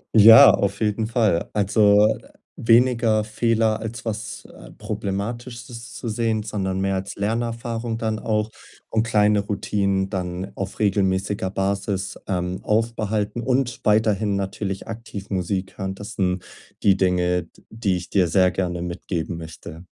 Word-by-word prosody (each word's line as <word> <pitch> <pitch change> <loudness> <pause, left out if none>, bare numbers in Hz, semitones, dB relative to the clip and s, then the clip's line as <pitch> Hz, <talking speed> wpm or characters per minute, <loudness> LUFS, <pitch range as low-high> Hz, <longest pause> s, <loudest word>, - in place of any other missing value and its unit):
Ja, 110 +1 +10
auf 100 0 0
jeden 110 0 0
Fall. 110 -8 +1
Also, 105 +1 +4 0.4
weniger 115 -2 +3
Fehler, 110 0 +1
als 115 +2 -6
was, 110 0 -5
äh, - - -14
Problematisches 115 +3 -5
zu 120 - -6
sehen, 110 -1 0
sondern 95 -3 -2
mehr 95 0 0
als 95 0 -4
Lernerfahrung 115 +1 -2
dann 110 -1 -2
auch 105 0 -1 0.4
und 110 - +2
kleine 105 -1 +3
Routinen 100 -1 -1
dann 90 0 -4
auf 100 - -5
regelmäßiger 95 -1 0
Basis, 100 0 -2
ähm, 90 -1 -2
aufbehalten 110 0 -1
und 125 0 0
weiterhin 105 -1 +2
natürlich 95 0 -4
aktiv 105 -3 -8
Musik 95 +1 -2
hören. 95 0 -3
Das 105 +1 -8
sind 90 -2 -1 0.4
die 100 -2 +5
Dinge, 90 -2 +1
d - - -24
die 110 -4 0
ich 90 - -9
dir 95 -3 +3
sehr 90 +2 +3
gerne 90 -2 -2
mitgeben 85 -1 -4
möchte. 80 +1 -9
105 Hz, 140 wpm, -23 LUFS, 95-110 Hz, 0.4 s, Ja